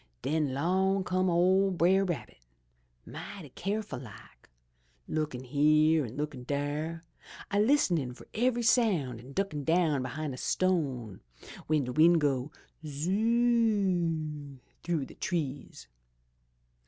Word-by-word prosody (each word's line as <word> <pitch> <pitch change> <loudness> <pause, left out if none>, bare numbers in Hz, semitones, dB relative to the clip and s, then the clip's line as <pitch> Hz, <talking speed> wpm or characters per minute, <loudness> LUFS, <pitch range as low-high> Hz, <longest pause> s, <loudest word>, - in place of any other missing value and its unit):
Den 150 +1 0
'long 190 +6 +1
come 185 0 +1
ole 185 +3 +3
Brer 185 +2 +3
Rabbit, 150 - -5 0.6
mighty 170 -8 -9
keerful 195 - -4
like, 105 - -14 0.6
lookin' 150 -5 -3
here 155 +4 +3
an' 115 - -10
lookin' 145 -3 -4
dere, 145 +5 -3 0.5
a 200 - +2
listenin' 190 - +2
fur - - -14
ev'ry 240 +1 +1
sound 180 - +2
an' 130 +4 -12
duckin' 195 -6 -2
down 160 -3 +2
behin' 140 +3 -4
a - - -7
stone 135 - -1 0.5
w'en 155 -2 +2
de 125 - -4
wind 165 +3 +5
go, 140 -2 0 0.3
'Zoo 150 +3 -3
oo!' 190 - +1 0.2
through 165 -5 -1
de - - -13
trees. 145 -6 -4
155 Hz, 120 wpm, -30 LUFS, 140-190 Hz, 0.6 s, wind